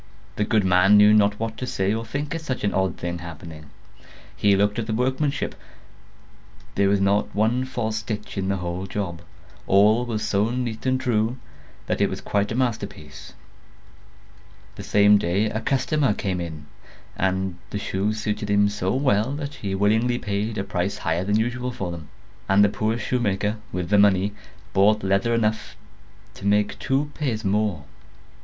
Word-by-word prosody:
The 105 Hz, -, 0 dB
good 110 Hz, -1 st, +2 dB
man 95 Hz, +3 st, +5 dB
knew 105 Hz, +1 st, +7 dB
not 105 Hz, -1 st, +3 dB
what 115 Hz, 0 st, -3 dB
to 130 Hz, -, -4 dB
say 95 Hz, -3 st, 0 dB
or 115 Hz, +1 st, -2 dB
think 145 Hz, +7 st, -4 dB
at 165 Hz, -, -4 dB
such 130 Hz, -5 st, -4 dB
an 100 Hz, -, +1 dB
odd 95 Hz, 0 st, 0 dB
thing 85 Hz, 0 st, -4 dB
happening. 80 Hz, -2 st, -10 dB, 0.7 s
He 100 Hz, -1 st, +3 dB
looked 100 Hz, +2 st, +1 dB
at 110 Hz, -, -3 dB
the 110 Hz, -, -1 dB
workmanship; 130 Hz, +4 st, -1 dB, 1.2 s
there 100 Hz, 0 st, +2 dB
was 100 Hz, 0 st, +3 dB
not 100 Hz, +1 st, +1 dB
one 115 Hz, +5 st, +1 dB
false 110 Hz, -4 st, -2 dB
stitch 105 Hz, -1 st, -5 dB
in 95 Hz, -2 st, -2 dB
the 100 Hz, -, +1 dB
whole 90 Hz, +1 st, -4 dB
job; 90 Hz, -4 st, -4 dB, 0.5 s
all 105 Hz, +5 st, +5 dB
was 110 Hz, -3 st, -2 dB
so 100 Hz, +2 st, +1 dB
neat 120 Hz, -1 st, -3 dB
and 130 Hz, 0 st, +2 dB
true, 120 Hz, -2 st, 0 dB, 0.5 s
that -, -, -1 dB
it -, -, +3 dB
was -, -, -5 dB
quite 100 Hz, +1 st, -1 dB
a -, -, -2 dB
masterpiece. 100 Hz, -, -4 dB, 1.4 s
The -, -, -9 dB
same 105 Hz, 0 st, +5 dB
day 95 Hz, +5 st, +1 dB
a 110 Hz, -, -3 dB
customer 135 Hz, -2 st, +1 dB
came 95 Hz, -3 st, -2 dB
in, 80 Hz, -3 st, -7 dB, 0.5 s
and 95 Hz, -1 st, -1 dB
the -, -, -4 dB
shoes 100 Hz, +2 st, -2 dB
suited 105 Hz, -1 st, -3 dB
him 100 Hz, 0 st, +4 dB
so 100 Hz, 0 st, -1 dB
well 125 Hz, -3 st, +2 dB
that 145 Hz, 0 st, -5 dB
he 95 Hz, -2 st, -4 dB
willingly 110 Hz, +5 st, +2 dB
paid 105 Hz, 0 st, -3 dB
a 100 Hz, -, -1 dB
price 100 Hz, -1 st, -2 dB
higher 80 Hz, +2 st, -1 dB
than 105 Hz, +2 st, 0 dB
usual 125 Hz, +2 st, -2 dB
for 95 Hz, -7 st, -4 dB
them; 80 Hz, -3 st, -8 dB, 0.4 s
and 100 Hz, +1 st, +5 dB
the 105 Hz, -, +4 dB
poor 110 Hz, +2 st, -1 dB
shoemaker, 105 Hz, -3 st, -1 dB
with 90 Hz, -1 st, -3 dB
the 105 Hz, -, +5 dB
money, 100 Hz, 0 st, +3 dB, 0.4 s
bought 105 Hz, +2 st, +4 dB
leather 100 Hz, +5 st, +1 dB
enough 110 Hz, -1 st, -1 dB, 0.6 s
to 100 Hz, -, -6 dB
make 105 Hz, 0 st, +1 dB
two 140 Hz, +2 st, 0 dB
pairs 120 Hz, -8 st, -2 dB
more. 100 Hz, -5 st, 0 dB
105 Hz, 175 wpm, -24 LUFS, 95-115 Hz, 1.4 s, knew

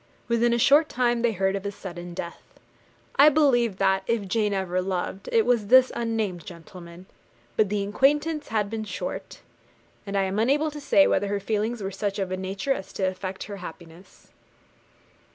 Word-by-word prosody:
Within 235 Hz, 0 st, +2 dB
a 235 Hz, -, +2 dB
short 290 Hz, +6 st, +5 dB
time 240 Hz, -1 st, +1 dB
they 235 Hz, -1 st, +2 dB
heard 190 Hz, 0 st, 0 dB
of 195 Hz, -, -4 dB
his 200 Hz, -1 st, -5 dB
sudden 175 Hz, -2 st, -8 dB
death. 170 Hz, -, -6 dB, 0.8 s
I 285 Hz, +2 st, +8 dB
believe 245 Hz, -9 st, +2 dB
that, 190 Hz, 0 st, +2 dB
if 230 Hz, -4 st, -1 dB
Jane 210 Hz, +1 st, 0 dB
ever 185 Hz, -2 st, -1 dB
loved, 190 Hz, +1 st, -4 dB
it 460 Hz, -2 st, +3 dB
was 235 Hz, -4 st, +1 dB
this 260 Hz, +3 st, +6 dB
unnamed 220 Hz, -7 st, -2 dB
gentleman; 170 Hz, +1 st, -12 dB, 0.5 s
but 210 Hz, -3 st, +2 dB
the 205 Hz, -1 st, -1 dB
acquaintance 295 Hz, +8 st, +1 dB
had 215 Hz, -2 st, 0 dB
been 220 Hz, +1 st, -4 dB
short, 215 Hz, -, -6 dB, 0.7 s
and 200 Hz, 0 st, -2 dB
I 195 Hz, -, +2 dB
am 190 Hz, +2 st, -2 dB
unable 290 Hz, +7 st, +2 dB
to 295 Hz, 0 st, -8 dB
say 290 Hz, +1 st, +4 dB
whether 205 Hz, -, +1 dB
her 200 Hz, 0 st, -1 dB
feelings 215 Hz, +2 st, -2 dB
were 195 Hz, -, -2 dB
of -, -, -11 dB
such 200 Hz, 0 st, -3 dB
a 195 Hz, -, 0 dB
nature 195 Hz, +7 st, -2 dB
as 190 Hz, -, -8 dB
to 195 Hz, -, -4 dB
affect 185 Hz, 0 st, -3 dB
her 200 Hz, -1 st, -7 dB
happiness. 170 Hz, 0 st, -12 dB
205 Hz, 185 wpm, -25 LUFS, 190-240 Hz, 0.8 s, I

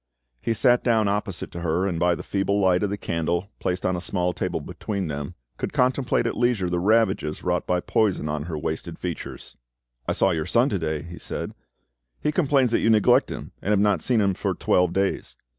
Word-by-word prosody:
He 115 Hz, -, 0 dB
sat 120 Hz, +3 st, +3 dB
down 110 Hz, -3 st, +3 dB
opposite 100 Hz, -2 st, -2 dB
to 85 Hz, -, -6 dB
her, 85 Hz, +2 st, 0 dB
and 90 Hz, -4 st, -1 dB
by 90 Hz, 0 st, +3 dB
the -, -, -7 dB
feeble 100 Hz, +1 st, 0 dB
light 95 Hz, -2 st, +3 dB
of 105 Hz, -, 0 dB
the 100 Hz, -, -3 dB
candle 85 Hz, +3 st, -2 dB
placed 90 Hz, 0 st, -2 dB
on 90 Hz, -, +1 dB
a 90 Hz, -, -3 dB
small 90 Hz, -1 st, -1 dB
table -, -, -2 dB
between 100 Hz, -3 st, -4 dB
them 70 Hz, -1 st, -5 dB, 0.2 s
could -, -, -4 dB
contemplate 130 Hz, 0 st, +2 dB
at -, -, -1 dB
leisure 120 Hz, -6 st, +1 dB
the 90 Hz, 0 st, 0 dB
ravages 100 Hz, -5 st, +1 dB
wrought 90 Hz, 0 st, 0 dB
by 90 Hz, -1 st, +1 dB
poison 100 Hz, -8 st, +1 dB
on 75 Hz, 0 st, -2 dB
her 85 Hz, -3 st, -4 dB
wasted 80 Hz, +2 st, -4 dB
features. 90 Hz, -3 st, -6 dB, 0.5 s
"I -, -, +1 dB
saw 95 Hz, -, +3 dB
your 80 Hz, -2 st, -1 dB
son 120 Hz, +8 st, +3 dB
to 100 Hz, -, -1 dB
day," 80 Hz, -2 st, -2 dB
he 85 Hz, +1 st, -9 dB
said: -, -, -5 dB, 0.7 s
"he 150 Hz, -, 0 dB
complains 140 Hz, -6 st, +2 dB
that -, -, +3 dB
you -, -, +3 dB
neglect 110 Hz, -2 st, +4 dB
him, -, -, -7 dB
and -, -, -3 dB
have 105 Hz, -2 st, +4 dB
not 100 Hz, -5 st, +2 dB
seen 120 Hz, -4 st, +2 dB
him 100 Hz, -1 st, +2 dB
for -, -, -2 dB
twelve 90 Hz, -1 st, +2 dB
days. 95 Hz, -10 st, -1 dB
95 Hz, 215 wpm, -24 LUFS, 85-105 Hz, 0.7 s, neglect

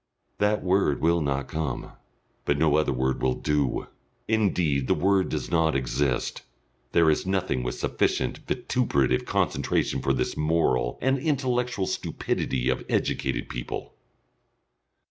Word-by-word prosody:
That 105 Hz, +1 st, +2 dB
word 95 Hz, -6 st, +2 dB
will 85 Hz, +1 st, +2 dB
not 70 Hz, -2 st, -1 dB
come. 75 Hz, -5 st, -3 dB, 0.5 s
But 70 Hz, -, +2 dB
no 75 Hz, -1 st, +3 dB
other 75 Hz, -2 st, +2 dB
word 65 Hz, 0 st, 0 dB
will 65 Hz, 0 st, +2 dB
do. 75 Hz, -3 st, 0 dB, 0.4 s
Indeed 90 Hz, -11 st, +1 dB
the -, -, +3 dB
word 95 Hz, -1 st, +2 dB
does -, -, -3 dB
not 80 Hz, -2 st, +2 dB
exist. 65 Hz, 0 st, -1 dB, 0.5 s
There 85 Hz, -2 st, +5 dB
is 75 Hz, -, -1 dB
nothing 95 Hz, -8 st, 0 dB
with 60 Hz, 0 st, -3 dB
sufficient -, -, 0 dB
vituperative 70 Hz, -, +1 dB
concentration -, -, 0 dB
for 65 Hz, -, +1 dB
this 65 Hz, -1 st, -1 dB
moral 75 Hz, -6 st, +1 dB
and 135 Hz, +1 st, +2 dB
intellectual 125 Hz, -7 st, 0 dB
stupidity 65 Hz, -7 st, -2 dB
of 65 Hz, -, 0 dB
educated 65 Hz, -2 st, -1 dB
people.... -, -, -6 dB
75 Hz, 130 wpm, -26 LUFS, 65-95 Hz, 0.5 s, There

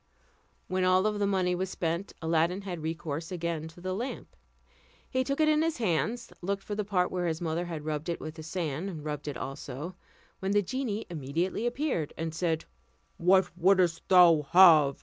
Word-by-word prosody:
When 185 Hz, 0 st, 0 dB
all 185 Hz, +1 st, +4 dB
the 205 Hz, -1 st, +1 dB
money 185 Hz, -2 st, +1 dB
was 185 Hz, +1 st, -2 dB
spent, 170 Hz, +2 st, -2 dB
Aladdin 165 Hz, +4 st, +1 dB
had 180 Hz, -4 st, -5 dB
recourse 160 Hz, +1 st, -4 dB
again 170 Hz, -3 st, -3 dB
to 165 Hz, +2 st, -14 dB
the 185 Hz, +1 st, -3 dB
lamp. 235 Hz, +7 st, -5 dB, 0.7 s
He 260 Hz, 0 st, 0 dB
took 275 Hz, +2 st, -2 dB
it 310 Hz, -, +4 dB
in 305 Hz, 0 st, +4 dB
his 325 Hz, 0 st, 0 dB
hands, 220 Hz, +3 st, -1 dB
looked 195 Hz, +2 st, -2 dB
for 210 Hz, -, -5 dB
the 210 Hz, +1 st, -1 dB
part 185 Hz, -3 st, 0 dB
where 180 Hz, -1 st, -1 dB
his 160 Hz, -1 st, -1 dB
mother 170 Hz, +1 st, -2 dB
had 160 Hz, -3 st, -6 dB
rubbed 155 Hz, +1 st, -3 dB
it 170 Hz, -, -2 dB
with 155 Hz, -, -6 dB
the 160 Hz, -, -9 dB
sand, 160 Hz, 0 st, -4 dB
rubbed 150 Hz, -1 st, -4 dB
it 145 Hz, -, -3 dB
also, 145 Hz, +4 st, -6 dB, 0.5 s
when 190 Hz, +1 st, -1 dB
the 205 Hz, 0 st, +3 dB
genie 225 Hz, 0 st, -3 dB
immediately 170 Hz, -, -2 dB
appeared, 240 Hz, -, -1 dB
and 165 Hz, -1 st, -3 dB
said, 165 Hz, -1 st, -1 dB, 0.5 s
"What 180 Hz, 0 st, +3 dB
wouldst 180 Hz, -2 st, +3 dB
thou 170 Hz, -5 st, +6 dB
have? 160 Hz, -7 st, +7 dB
175 Hz, 185 wpm, -29 LUFS, 160-195 Hz, 0.7 s, have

